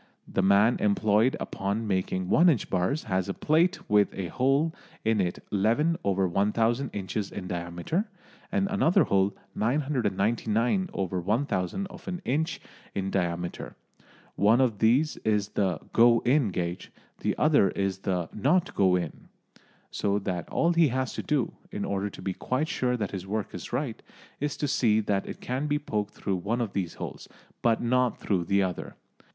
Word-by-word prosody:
The -, -, 0 dB
man 100 Hz, +5 st, +4 dB
employed 105 Hz, +3 st, +2 dB
upon 100 Hz, +4 st, -2 dB
making 95 Hz, -2 st, -1 dB
one 175 Hz, -, +5 dB
inch 135 Hz, -10 st, 0 dB
bars 95 Hz, -, 0 dB
has 95 Hz, -2 st, -1 dB
a 95 Hz, -, -2 dB
plate 170 Hz, +5 st, +1 dB
with 105 Hz, -1 st, +4 dB
a 95 Hz, -3 st, -4 dB
hole 135 Hz, -, +2 dB, 0.3 s
in 110 Hz, -2 st, +3 dB
it 90 Hz, -1 st, -1 dB
1 100 Hz, -, 0 dB
1/1000 110 Hz, -, +1 dB
inches 100 Hz, +1 st, -3 dB
in 95 Hz, -, -6 dB
diameter 85 Hz, -, -2 dB, 0.5 s
and 200 Hz, -1 st, +1 dB
another 185 Hz, -4 st, +4 dB
hole 95 Hz, 0 st, +1 dB, 0.2 s
999/1000 115 Hz, -, 0 dB
of -, -, -13 dB
an 180 Hz, -1 st, -3 dB
inch 160 Hz, +6 st, 0 dB, 0.4 s
in 95 Hz, 0 st, -2 dB
diameter. 85 Hz, -2 st, -2 dB, 0.6 s
One 110 Hz, +5 st, +4 dB
of 120 Hz, -6 st, +2 dB
these 130 Hz, +8 st, +3 dB
is 105 Hz, -2 st, 0 dB
the 95 Hz, -6 st, 0 dB
"go 115 Hz, 0 st, +6 dB
in" 130 Hz, 0 st, +3 dB
gauge; 90 Hz, -1 st, -4 dB, 0.3 s
the -, -, -1 dB
other 150 Hz, -10 st, +4 dB
is 95 Hz, -1 st, -2 dB
the 90 Hz, -3 st, -1 dB
"not 175 Hz, -, +1 dB
go 95 Hz, -2 st, +3 dB
in." 85 Hz, -4 st, -4 dB, 0.6 s
So 100 Hz, 0 st, 0 dB
that 95 Hz, -3 st, -3 dB
all 170 Hz, +1 st, +2 dB
he 165 Hz, -2 st, +5 dB
has 130 Hz, 0 st, -1 dB
to -, -, -3 dB
do, 145 Hz, -5 st, 0 dB, 0.2 s
in 105 Hz, -, -3 dB
order 100 Hz, +1 st, -1 dB
to 90 Hz, -, -11 dB
be 95 Hz, -, -1 dB
quite 130 Hz, -, -1 dB
sure 125 Hz, -1 st, 0 dB
that 105 Hz, -4 st, -3 dB
his 95 Hz, -1 st, -6 dB
work 105 Hz, +1 st, -3 dB
is -, -, -7 dB
right, 125 Hz, -2 st, -2 dB, 0.4 s
is 145 Hz, 0 st, -2 dB
to 145 Hz, -, -1 dB
see 115 Hz, -6 st, +3 dB
that 100 Hz, -2 st, -1 dB
it -, -, -7 dB
can 130 Hz, +4 st, -2 dB
be 145 Hz, 0 st, +1 dB
poked 105 Hz, -8 st, -3 dB
through 95 Hz, -2 st, -2 dB
one 105 Hz, +7 st, -2 dB
of 115 Hz, -4 st, -2 dB
these 90 Hz, -4 st, -2 dB
holes, -, -, -7 dB, 0.3 s
but 115 Hz, -1 st, +2 dB
not 125 Hz, 0 st, +2 dB
through 90 Hz, -4 st, -1 dB
the 100 Hz, +3 st, +2 dB
other. 90 Hz, -2 st, -4 dB
105 Hz, 165 wpm, -27 LUFS, 95-130 Hz, 0.6 s, go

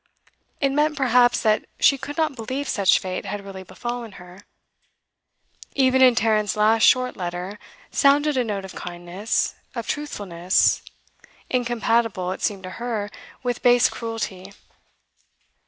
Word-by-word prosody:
It 275 Hz, -, +2 dB
meant, 300 Hz, +1 st, +1 dB
perhaps, 245 Hz, -2 st, +3 dB
that 215 Hz, -2 st, +2 dB
she 275 Hz, -, +5 dB
could 290 Hz, +3 st, -7 dB
not 310 Hz, -3 st, 0 dB
believe 260 Hz, +5 st, -4 dB
such 200 Hz, -6 st, +3 dB
fate 185 Hz, -1 st, -4 dB
had 205 Hz, -1 st, -5 dB
really 195 Hz, -1 st, -8 dB
befallen 235 Hz, +4 st, -6 dB
her. 180 Hz, 0 st, -13 dB, 1.4 s
Even 260 Hz, -1 st, +3 dB
in 255 Hz, -2 st, +7 dB
Tarrant's 215 Hz, -4 st, +1 dB
last 220 Hz, +1 st, +3 dB
short 255 Hz, +2 st, +4 dB
letter 180 Hz, +2 st, -5 dB, 0.3 s
sounded 290 Hz, +1 st, +3 dB
a 255 Hz, -, +2 dB
note 205 Hz, -4 st, -4 dB
of 190 Hz, -, -10 dB
kindness, 175 Hz, +5 st, -3 dB, 0.2 s
of 235 Hz, -2 st, -4 dB
truthfulness, 190 Hz, -, 0 dB, 0.7 s
incompatible, 230 Hz, -6 st, 0 dB
it 190 Hz, -, -6 dB
seemed 195 Hz, -3 st, -2 dB
to 185 Hz, -, -6 dB
her, 220 Hz, -4 st, -3 dB, 0.3 s
with 245 Hz, -1 st, -2 dB
base 245 Hz, -1 st, +5 dB
cruelty. 210 Hz, -4 st, -5 dB
225 Hz, 135 wpm, -23 LUFS, 190-255 Hz, 1.4 s, in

